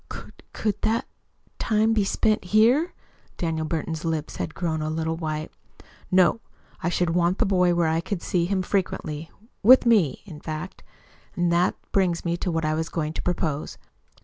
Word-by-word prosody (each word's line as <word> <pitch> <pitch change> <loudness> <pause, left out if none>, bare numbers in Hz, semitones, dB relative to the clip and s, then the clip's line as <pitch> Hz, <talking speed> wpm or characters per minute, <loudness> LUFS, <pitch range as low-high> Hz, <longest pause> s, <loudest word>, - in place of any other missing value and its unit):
"Could - - -10
could 210 -3 -2
that 225 +1 +1 0.5
time 220 +1 +2
be 215 -2 +2
spent 215 +1 +1
here?" 235 - +3 0.4
Daniel 160 -2 -2
Burton's 160 0 -3
lips 160 -2 -3
had 160 - -4
grown 160 -3 -1
a 155 - -2
little 160 +1 -1
white. 155 -1 -4 0.6
"No. 185 +4 +4 0.4
I 170 - 0
should 175 -1 0
want 175 +2 +2
the 235 - +2
boy 180 -3 +3
where 170 -1 +2
I 160 +1 +1
could 185 0 -4
see 175 -2 +1
him 190 0 0
frequently 165 -5 -2 0.3
with 250 +5 +7
me, 205 - +3
in 160 -7 -10
fact. 155 +4 -6 0.5
And 175 -2 +1
that 175 +2 +2 0.2
brings 180 -4 +1
me 170 0 +1
to 185 - -2
what 165 -2 -1
I 155 - +1
was 160 +1 -2
going 155 -2 -2
to - - -4
propose. 160 -4 -2
175 Hz, 175 wpm, -25 LUFS, 160-195 Hz, 0.6 s, with